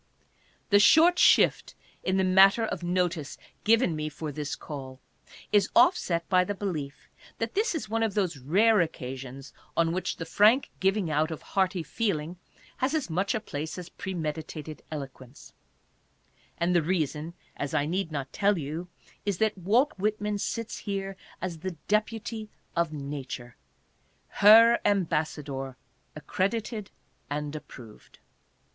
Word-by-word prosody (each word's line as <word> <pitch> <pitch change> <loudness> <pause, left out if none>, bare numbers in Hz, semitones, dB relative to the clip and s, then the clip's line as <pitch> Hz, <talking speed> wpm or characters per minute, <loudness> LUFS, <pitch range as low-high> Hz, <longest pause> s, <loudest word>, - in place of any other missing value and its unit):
The 205 - +7
short 335 - +6
shift - - +4 0.3
in 185 +1 +1
the 190 - +3
matter 195 +4 +6
of - - -4
notice 175 -4 -1 0.3
given 220 -6 +3
me 155 0 -3
for 155 0 -6
this 145 0 -4
call 130 -3 -8 0.5
is 205 -2 +4
offset 210 - +3
by 185 -1 +4
the 205 +2 -3
belief 155 -8 -5 0.3
that 225 0 -3
this 420 -2 +1
is 310 - -3
one 225 +1 -1
of 220 -3 0
those 180 -8 0
rare 200 - +4
occasions 135 -3 -6 0.2
on 165 -1 +3
which 185 +2 -2
the 165 - -5
frank 215 +10 +4
giving 195 -3 +1
out 155 +1 +1
of 160 - -7
hearty 190 -2 +1
feeling 175 -5 -2 0.4
has 270 +4 0
as 290 - -2
much 190 +4 0
a - - 0
place 160 -6 -5
as 180 -1 -7
premeditated 155 -4 -5
eloquence; 135 -3 -9 1.0
and 175 +1 +1
the 170 - +5
reason, 160 -1 -2 0.2
as 145 +1 -4
I 145 -2 +2
need 175 +2 -2
not 140 -3 -5
tell 205 -1 +2
you, 160 +4 -5 0.4
is, 200 -3 -1
that 220 +1 +1
Walt 225 - +2
Whitman 210 0 -1
sits 230 +2 -3
here 195 -1 -4 0.3
as 175 -3 -4
the 180 0 -5
deputy 215 +1 -1 0.3
of 170 -2 +1
nature, 140 -4 -6 0.7
her 230 +3 +7
embassador 150 -8 -1 0.4
accredited 200 - -2 0.4
and 150 +1 -3
approved. 120 -7 -12
180 Hz, 140 wpm, -28 LUFS, 150-210 Hz, 1.0 s, The